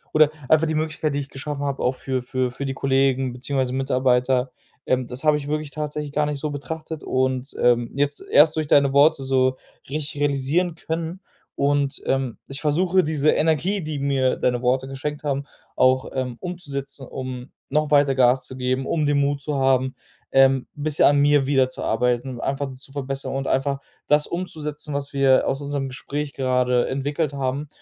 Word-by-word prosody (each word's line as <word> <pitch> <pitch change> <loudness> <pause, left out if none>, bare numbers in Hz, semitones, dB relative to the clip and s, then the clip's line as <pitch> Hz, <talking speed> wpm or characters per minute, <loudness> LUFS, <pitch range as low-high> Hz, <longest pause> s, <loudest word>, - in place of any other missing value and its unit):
oder, 155 -1 +6 0.2
einfach 155 +1 +4
die 160 - -1
Möglichkeit, 155 -1 -1
die 145 - -1
ich 140 -1 -6
geschaffen 145 +1 -5
habe, 140 -1 -2
auch 125 +1 +1
für 130 -1 -3
für 130 0 -1
für 140 +3 -5
die 135 - -2
Kollegen 135 -1 +1
beziehungsweise 130 0 -2
Mitarbeiter, 130 -1 +1 0.4
ähm, 130 0 +1
das 125 +3 -3
habe 150 -1 +4
ich 145 - -6
wirklich 150 0 -2
tatsächlich 150 0 -4
gar 150 0 +1
nicht 145 -1 -3
so 150 +1 -2
betrachtet 155 +3 -6
und, 130 +1 -1
ähm, 120 -1 +3
jetzt 145 +1 -1
erst 150 +1 +6
durch 155 -1 0
deine 140 -1 +4
Worte 145 +1 +5
so 130 -1 +2 0.3
richtig 145 +1 -3
realisieren 145 +5 +1
können. 165 +2 -4 0.4
Und, 140 -1 0
ähm, 135 -3 0
ich 135 +1 -6
versuche, 180 +5 +2
diese 155 -1 +1
Energie, 165 +6 +1
die 155 -2 -4
mir 135 -2 +1
deine 125 0 0
Worte 130 +2 +1
geschenkt 145 +3 -5
haben, 140 -1 -1 0.3
auch, 130 0 +3
ähm, 125 -2 -3
umzusetzen, 140 -7 -6
um 130 0 -6 0.2
noch 150 -1 0
weiter 140 -2 +4
Gas 125 0 +4
zu 130 - -9
geben, 130 +1 -1
um 155 -2 0
den 145 0 +2
Mut 140 0 +1
zu 150 +1 -2
haben, 130 0 +2 0.4
ähm, 135 -1 +4
bisschen 150 0 +1
an 145 0 +5
mir 145 -1 +4
wieder 135 -2 +3
zu 130 - -7
arbeiten, 125 +1 0
einfach 135 0 -2
zu 135 +1 -14
verbessern 135 -1 -4
und 135 0 -2
einfach 135 +1 0 0.3
das 150 0 +5
umzusetzen, 150 -4 -4
was 140 0 -4
wir 135 -1 +4
aus 135 +2 -1
unserem 140 -1 -3
Gespräch 145 +2 -5
gerade 125 -2 +1
entwickelt 145 +2 -2
haben. 140 +2 -2
140 Hz, 185 wpm, -23 LUFS, 130-150 Hz, 0.4 s, oder